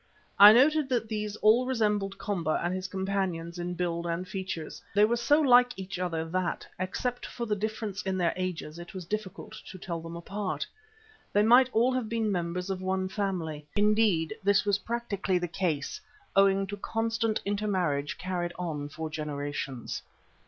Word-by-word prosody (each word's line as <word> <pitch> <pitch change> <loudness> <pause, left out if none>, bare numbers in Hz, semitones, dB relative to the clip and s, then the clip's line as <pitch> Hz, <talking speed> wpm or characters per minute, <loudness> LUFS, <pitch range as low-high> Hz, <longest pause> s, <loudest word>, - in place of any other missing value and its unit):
I 205 +1 +12
noted 280 +5 +4
that 235 -4 0
these 210 -1 -3
all 230 +4 +5
resembled 210 -5 0
Komba 175 -7 -1
and 175 +1 0
his 185 +1 -3
companions 190 -3 -2
in 175 0 -3
build 170 -1 -2
and 170 +2 -2
features; 185 -5 -5
they 205 +1 +6
were 235 +2 +1
so 290 +6 +3
like 245 -5 +5
each 190 -1 -5
other 165 -3 -1
that, 185 0 -1
except 245 +7 -2
for 240 - -5
the 210 -2 0
difference 210 -1 -3
of 190 -1 -1
their 175 -2 +1
ages, 175 -3 -4
it 175 +4 -10
was 185 -2 -6
difficult 210 +1 -5 0.2
to 185 - -8
tell 170 -2 -5
them 165 +1 -8
apart. 185 -3 -3 0.7
They 205 - +4
might 245 +3 +6
all 240 +3 +3
have 250 -4 -2
been 225 -2 0
members 180 +1 -2
of 185 -1 -3
one 185 0 -1
family; 170 -7 -3
indeed, 210 -4 +3
this 200 +1 +3
was 200 -1 +2
practically 205 -5 -1
the 175 0 -2
case, 165 -4 -2 0.3
owing 195 0 +4
to 205 +1 -6
constant 225 +1 -1
intermarriage 185 -9 -1
carried 175 -1 -3
on 150 -5 -3
for 160 +2 -5
generations. 145 -4 -4
190 Hz, 170 wpm, -29 LUFS, 175-215 Hz, 0.7 s, I